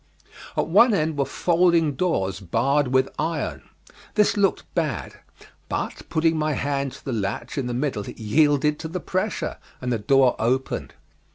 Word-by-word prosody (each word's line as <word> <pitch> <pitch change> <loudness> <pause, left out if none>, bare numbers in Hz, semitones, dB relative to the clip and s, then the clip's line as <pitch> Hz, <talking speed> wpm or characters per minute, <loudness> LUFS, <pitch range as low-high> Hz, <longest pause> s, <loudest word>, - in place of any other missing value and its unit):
At - - +2
one 210 +7 +5
end 155 -2 0
were 140 -1 +1
folding 170 -3 +2
doors 100 - -1
barred 135 - +1
with 130 +1 +2
iron. 160 +2 -3 0.5
This 210 -1 +3
looked 200 -2 +2
bad, 155 -7 -2 0.5
but - - -4
putting 160 0 +2
my 155 0 +1
hand 140 -1 -1
to - - -14
the 135 - -2
latch 100 -2 -3
in 135 -3 -2
the 120 - -2
middle 125 -6 -2
it - - -10
yielded 145 +6 +2
to 160 - -5
the 175 +3 -4
pressure, 190 +4 -2 0.2
and 125 -1 -2
the 115 - -1
door 130 +4 +4
opened. 130 +4 -1
145 Hz, 165 wpm, -24 LUFS, 125-165 Hz, 0.5 s, one